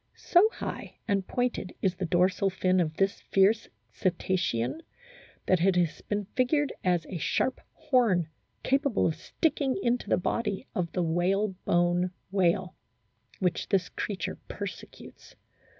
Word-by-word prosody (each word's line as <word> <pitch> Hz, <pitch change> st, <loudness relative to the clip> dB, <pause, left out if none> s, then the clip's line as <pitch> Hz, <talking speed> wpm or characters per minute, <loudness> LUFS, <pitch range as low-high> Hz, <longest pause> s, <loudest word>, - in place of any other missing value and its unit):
So 380 Hz, +5 st, +4 dB
high -, -, -6 dB
and 195 Hz, -3 st, 0 dB
pointed 245 Hz, -6 st, -2 dB
is 190 Hz, -, +1 dB
the 185 Hz, -1 st, -3 dB
dorsal 185 Hz, +3 st, +2 dB
fin 185 Hz, 0 st, +1 dB
of 160 Hz, -3 st, 0 dB
this 195 Hz, +2 st, 0 dB
fierce 200 Hz, +3 st, +4 dB, 0.2 s
Cetacean 180 Hz, -, -1 dB, 0.6 s
that 185 Hz, -3 st, +3 dB
it 190 Hz, -1 st, +4 dB
has 175 Hz, -3 st, +1 dB
been 205 Hz, -1 st, -2 dB
figured 290 Hz, +3 st, +2 dB
as 175 Hz, -3 st, +1 dB
a 180 Hz, -, -5 dB
sharp 260 Hz, -, 0 dB
horn 225 Hz, -, +2 dB, 0.4 s
capable 275 Hz, -3 st, +2 dB
of 165 Hz, -, +2 dB
sticking 280 Hz, -, -1 dB
into 240 Hz, +1 st, 0 dB
the -, -, +4 dB
body 205 Hz, +2 st, -1 dB
of 170 Hz, -3 st, -2 dB
the 180 Hz, -, +1 dB
whale 180 Hz, +5 st, +1 dB, 0.2 s
bone 175 Hz, +1 st, +2 dB, 0.2 s
whale, 185 Hz, -1 st, +1 dB, 0.6 s
which 180 Hz, -3 st, -1 dB
this 185 Hz, -3 st, +1 dB
creature 200 Hz, -3 st, -4 dB
persecutes. -, -, -9 dB
190 Hz, 135 wpm, -28 LUFS, 175-225 Hz, 0.6 s, So